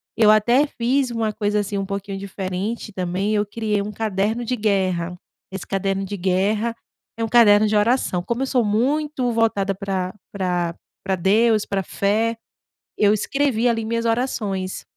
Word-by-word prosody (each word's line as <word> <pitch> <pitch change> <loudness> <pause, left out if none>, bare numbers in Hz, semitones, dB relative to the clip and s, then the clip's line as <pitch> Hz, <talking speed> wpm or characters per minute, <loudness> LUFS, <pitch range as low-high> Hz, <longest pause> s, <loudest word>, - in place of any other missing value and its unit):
Eu 220 -2 +5
até 240 +7 +4
fiz 260 +1 0
uma 225 -2 -1
coisa, 210 0 0
assim, 200 0 -3
um 195 - -2
pouquinho 200 0 -5
diferente 195 +3 -4
também, 185 +3 -1
eu 210 -1 +2
criei 210 -1 -1
um 210 - -4
caderno 215 +2 -1
de 250 - -1
guerra. 185 -5 0 0.3
Esse 195 0 -6
caderno 195 0 -1
de 205 - -5
guerra, 200 +5 0 0.4
é 230 - -2
um 225 - 0
caderno 215 -3 +6
de 210 - 0
oração. 210 -4 +2
Como 235 +8 -2
eu - - +1
sou 255 -2 +2
muito 255 +4 0
voltada 220 -4 +1
pra 190 -2 -3 0.2
pra 180 -3 -1 0.3
pra 195 -1 0
Deus, 215 +4 +3
para 195 -1 -1
fé, 220 +4 0 0.6
eu 205 0 +4
escrevi 245 +1 +1
ali 225 -1 -1
minhas 230 +1 -1
orações. 215 -5 -2
210 Hz, 165 wpm, -22 LUFS, 195-230 Hz, 0.6 s, caderno